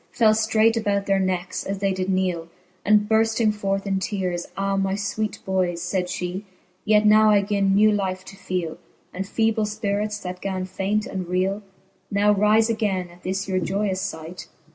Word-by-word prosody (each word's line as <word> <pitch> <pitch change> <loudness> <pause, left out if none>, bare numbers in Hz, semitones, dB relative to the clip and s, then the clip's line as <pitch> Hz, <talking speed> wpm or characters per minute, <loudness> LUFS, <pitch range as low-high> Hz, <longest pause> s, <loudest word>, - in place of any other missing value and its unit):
Fell 220 -2 +4
ftraight 220 +1 +3
about 205 -3 0
their 195 -1 +2
neckes, 185 -1 -2
as 195 0 -3
they 195 0 0
did 185 0 -3
kneele. 185 -3 0 0.4
And 210 0 +4
burfting 220 0 +2
forth 195 -1 -2
in 195 -1 0
teares; 185 -3 -2
Ah 195 0 0
my 195 0 0
fweet 205 +1 -2
boyes, 185 -3 0
Sayd 180 0 -1
fhe, 180 +2 -4 0.4
yet 215 0 +4
now 215 +1 +6
I 205 -1 +4
gin 200 -1 +1
new 215 +1 +5
life 190 -2 -2
to - - -11
feele, 180 -4 -4 0.3
And 190 +1 -4
feeble 220 0 +1
fpirits, 210 0 -2
that 180 0 -6
gan 190 -1 -3
faint 200 +3 -1
and 185 -2 -5
reele. 185 +3 0 0.5
Now 205 +1 +3
rife 210 +2 +4
againe, 205 -6 -1
at 175 +1 -18
this 190 +2 -3
your 185 -1 0
joyous 190 +2 -1
fight. 160 +3 -9
195 Hz, 180 wpm, -23 LUFS, 185-210 Hz, 0.5 s, now